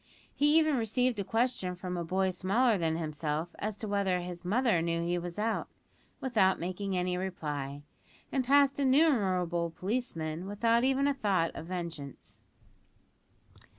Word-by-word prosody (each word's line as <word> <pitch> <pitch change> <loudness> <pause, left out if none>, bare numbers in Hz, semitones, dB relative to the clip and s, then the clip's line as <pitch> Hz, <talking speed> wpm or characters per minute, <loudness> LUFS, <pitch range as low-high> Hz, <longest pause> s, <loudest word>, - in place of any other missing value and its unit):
He 295 +2 +4
even 310 -3 +3
received 240 +1 +1
a - - 0
question 225 -4 0
from 180 0 -5
a 175 - -2
boy 190 +3 0
smaller 205 +7 +2
than 165 -3 0
himself 155 +1 -3
as 210 -1 -3
to 215 - -5
whether 200 -3 +1
"his 175 0 -6
mother 215 -1 +2
knew 170 0 -1
he 175 +1 0
was 175 +1 -6
out," 220 +2 -1 0.5
without 210 -8 +2
making 185 +2 -3
any 180 0 0
reply, 145 -6 -4 0.5
and 265 - +1
passed 280 +2 +4
innumerable 195 - +2
policemen 170 -3 -3
without 230 +3 +2
even 270 +2 +2
a 285 - +2
thought 195 -10 +1
of 160 - -8
vengeance! 170 -7 -7
190 Hz, 150 wpm, -30 LUFS, 170-235 Hz, 0.5 s, He